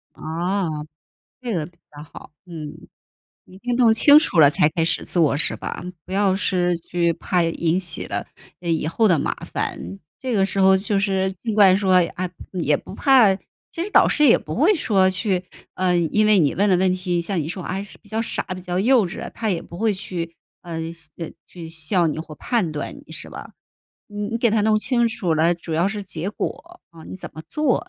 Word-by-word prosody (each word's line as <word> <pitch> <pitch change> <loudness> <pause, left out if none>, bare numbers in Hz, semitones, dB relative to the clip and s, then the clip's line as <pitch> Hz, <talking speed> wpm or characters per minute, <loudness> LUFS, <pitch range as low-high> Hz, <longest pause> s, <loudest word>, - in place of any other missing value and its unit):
啊， 175 +3 -2 0.7
这 245 -2 -4
个 160 -4 -1
比 170 -1 -20 0.2
较 145 - -8
好。 150 - -13 0.2
嗯， 155 -4 -8 0.7
你 185 - -16
一 - - -12
定 245 +2 -2
弄 240 -2 +5
清 285 +6 +7
楚 200 - 0
了 145 - +8
才 150 +1 +5
开 160 +1 -1
始 - - 0
做， 160 -5 +2
是 145 - +1
吧？ - - -6 0.2
不 - - -12
要 195 -1 +2
是 180 -3 0
去 170 0 0
怕 180 +1 0
引 165 +1 0
起 180 -3 +1
了， - - -4 0.4
呃， 175 - -4
以 160 -2 0
后 220 +7 +2
的 175 -5 +4
麻 - - -1 0.2
烦。 95 +3 -4 0.2
这 260 -2 -3
个 195 -3 +3
时 195 0 -3
候 190 0 +6
就 200 +1 -1
是 190 -1 0
尽 220 +4 -5
管 195 -3 +6
说， 190 -1 +1 0.2
啊， 185 0 -3 0.3
也 150 -2 +2
不 - - -11
怕 250 -8 +5
其 330 - -9
实 400 - -5
导 - - +5
师 300 - +3
也 240 - +6
不 155 - -7
会 325 - +4
说 195 - +2
去 185 -1 -1 0.3
呃， 180 -1 +1
因 175 +6 +2
为 210 -2 +5
你 150 -5 +2
问 200 +2 +2
的 185 - +4
问 185 0 +2
题 180 -1 -1
像 175 0 -2
你 150 - -5
说， 185 +2 -5
哎 190 +2 -3
呀， - - -4
是 200 - -11
比 - - -22
较 220 +2 -2
傻、 230 - -1
比 185 - -9
较 180 0 -2
幼 235 +1 +4
稚 175 - -8
的， - - -6
他 225 -2 -3
也 175 -4 -1
不 170 - -11
会 220 +1 +1
去， 170 -3 -6 0.3
呃， 165 -1 -5
笑 165 -2 -9
呃， 165 - -5 0.2
去 170 -2 -10
笑 165 +2 0
你 155 - -3
或 160 -1 -8
判 215 - -1
断 150 - -5
你， - - -15
是 - - -8
吧？ - - -10 0.6
你 205 -1 -5
你 230 +1 -2
给 235 -1 +2
它 220 0 +2
弄 215 +1 +3
清 235 +1 +1
楚 185 -8 -1
了， 165 +3 +3
主 170 -1 -8
要 170 +4 +2
是 205 0 -5
结 180 0 -4
果， 325 +11 -6
啊， 165 -1 -14
你 - - -8
怎 - - -9
么 155 - -9
做。 300 -5 0
185 Hz, 245 characters per minute, -22 LUFS, 170-215 Hz, 0.7 s, 了